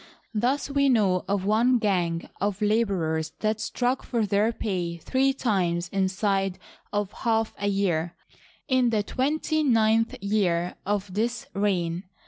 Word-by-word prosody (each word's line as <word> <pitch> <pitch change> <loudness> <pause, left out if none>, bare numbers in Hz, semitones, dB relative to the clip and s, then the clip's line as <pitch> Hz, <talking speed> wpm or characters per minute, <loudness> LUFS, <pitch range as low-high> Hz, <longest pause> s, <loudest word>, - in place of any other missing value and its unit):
Thus 250 +6 0
we 280 0 +2
know 200 -7 +3
of 195 -1 0
one 235 +5 +3
gang 180 -6 0
of 205 0 -1
laborers 190 -8 0
that 215 0 0
struck 245 +3 -1
for 230 -3 -1
their 205 +2 +2
pay 180 -6 -3
three 260 +10 +1
times 180 -9 0
inside 195 0 0 0.3
of 205 -1 -1
half 225 -1 0
a 205 - -1
year, 175 -4 0 0.5
in 255 -3 +3
the 215 -3 +1
twenty 305 +7 0
ninth 225 -3 +3
year 185 -4 0
of 200 -2 -1
this 230 +4 -1
reign. 185 -3 0
205 Hz, 135 wpm, -26 LUFS, 185-230 Hz, 0.5 s, know